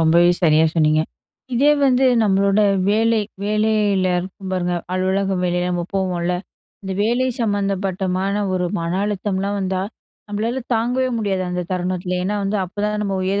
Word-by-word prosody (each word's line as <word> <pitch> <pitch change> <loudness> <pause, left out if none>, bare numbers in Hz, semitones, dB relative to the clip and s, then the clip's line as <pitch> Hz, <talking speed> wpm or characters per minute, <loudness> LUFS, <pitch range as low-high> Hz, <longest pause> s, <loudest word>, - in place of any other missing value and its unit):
ரொம்பவே 170 +2 +5
சரியா 160 -1 +5
சொன்னீங்க. 155 -1 +3 0.5
இதே 280 +5 +4
வந்து 265 -1 +3 0.2
நம்மளோட 200 0 +3 0.3
வேலை 225 +1 +3 0.2
வேலையில 210 -3 +1
இருக்கும் 190 +1 -8
பாருங்க. 180 -1 0 0.2
அலுவலகம் 190 0 0
வேலை 180 0 0
நம்ம 175 -1 -1
போவோம்ல. 180 -2 0 0.5
இந்த 190 -1 -4
வேலை 240 +4 +1
சம்மந்தப்பட்டமான 195 -2 -1
ஒரு 180 -1 0 0.2
மன 170 0 -2
அழுத்தம்லாம் 200 0 -2
வந்தா, 190 -1 -1 0.5
நம்பளால 225 +5 -2
தாங்கவே 250 +3 +1
முடியாது, 195 -4 -1
அந்த 180 0 -2
தருணத்தில. 180 0 -2
ஏன்னா 205 +2 -1
வந்து, 200 +2 0
அப்போதான் 210 +3 -2
நம்ம 195 -2 -1
உயர 195 +2 0
195 Hz, 140 wpm, -20 LUFS, 180-210 Hz, 0.5 s, ரொம்பவே